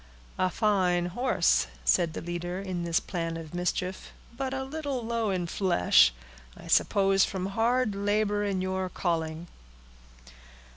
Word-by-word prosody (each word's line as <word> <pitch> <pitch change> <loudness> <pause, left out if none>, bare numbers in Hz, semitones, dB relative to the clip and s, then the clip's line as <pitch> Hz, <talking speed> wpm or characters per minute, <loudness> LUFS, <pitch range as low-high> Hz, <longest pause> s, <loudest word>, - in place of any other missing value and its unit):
"A 185 - +2
fine 185 -4 +1
horse!" 250 +4 +2 0.2
said 170 -3 +3
the - - -5
leader 175 +1 -4
in 185 -3 -4
this 170 -1 +2
plan 165 -3 -4
of 160 -1 -9
mischief; 180 +1 -3 0.2
"but 265 +1 -3
a 265 0 -2
little 275 -3 -4
low 230 -2 -1
in 185 -2 -1
flesh. 165 - +4 0.5
I - - -12
suppose 195 -1 +3
from 185 -1 -2
hard 225 +3 +1
labor 205 +1 0
in 195 -2 -1
your 185 0 -2
calling." 165 -2 -2
190 Hz, 140 wpm, -28 LUFS, 175-215 Hz, 0.5 s, flesh